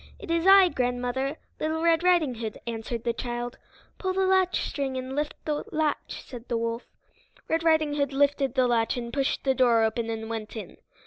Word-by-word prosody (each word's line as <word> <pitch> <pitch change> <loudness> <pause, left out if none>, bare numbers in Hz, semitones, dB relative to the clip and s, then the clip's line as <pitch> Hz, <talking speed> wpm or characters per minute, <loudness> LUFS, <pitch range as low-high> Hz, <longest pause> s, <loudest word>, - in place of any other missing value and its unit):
"It 405 -8 -7
is 335 +2 +1
I, 385 -1 +8
grandmother; 250 +2 -1 0.2
Little 315 +1 -1
Red 335 -1 +4
Riding 345 -7 +3
Hood," 225 -2 -5
answered 230 0 -4
the 235 - 0
child. 240 0 -4 0.4
"Pull 375 -1 -1
the 380 0 +1
latchstring, 365 -8 +1
and 260 +1 -5
lift 295 +1 -2
the 300 -1 -1
latch," 310 -1 -2
said 245 -2 -10
the 235 - 0
wolf. 230 +1 -3 0.6
Red 325 0 +1
Riding 315 -2 +3
Hood 285 -1 0
lifted 275 -1 +1
the 255 -1 +4
latch 235 0 +1
and 235 -1 -5
pushed 275 -1 0
the 265 - +3
door 240 -4 +4
open 225 +1 -1
and 220 0 -4
went 225 -1 -5
in. 220 - -8
265 Hz, 190 wpm, -27 LUFS, 235-315 Hz, 0.6 s, I